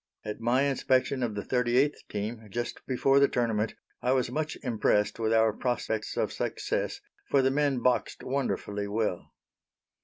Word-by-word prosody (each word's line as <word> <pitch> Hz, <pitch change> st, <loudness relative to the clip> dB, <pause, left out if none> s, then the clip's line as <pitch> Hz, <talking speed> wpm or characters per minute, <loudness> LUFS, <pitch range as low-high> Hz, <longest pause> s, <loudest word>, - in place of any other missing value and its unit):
At 105 Hz, 0 st, -4 dB
my 120 Hz, +4 st, +3 dB
inspection 135 Hz, -1 st, +1 dB
of 115 Hz, -4 st, -1 dB
the 100 Hz, -, -3 dB
38th 125 Hz, +3 st, +1 dB
team, 110 Hz, +2 st, -4 dB
just 120 Hz, +4 st, -4 dB
before 135 Hz, +1 st, +3 dB
the 140 Hz, -, +6 dB
tournament, 115 Hz, -4 st, 0 dB, 0.3 s
I 125 Hz, -, +2 dB
was 130 Hz, -2 st, +1 dB
much 155 Hz, +1 st, -2 dB
impressed 105 Hz, -3 st, +1 dB
with 110 Hz, -1 st, +1 dB
our 110 Hz, -1 st, +4 dB
prospects 110 Hz, -2 st, -2 dB
of -, -, 0 dB
success, -, -, -2 dB, 0.3 s
for 135 Hz, -1 st, +4 dB
the 130 Hz, -, +3 dB
men 140 Hz, -3 st, +1 dB
boxed 125 Hz, -1 st, +1 dB
wonderfully 105 Hz, -6 st, -2 dB
well. 105 Hz, -4 st, -2 dB
120 Hz, 155 wpm, -29 LUFS, 110-135 Hz, 0.3 s, the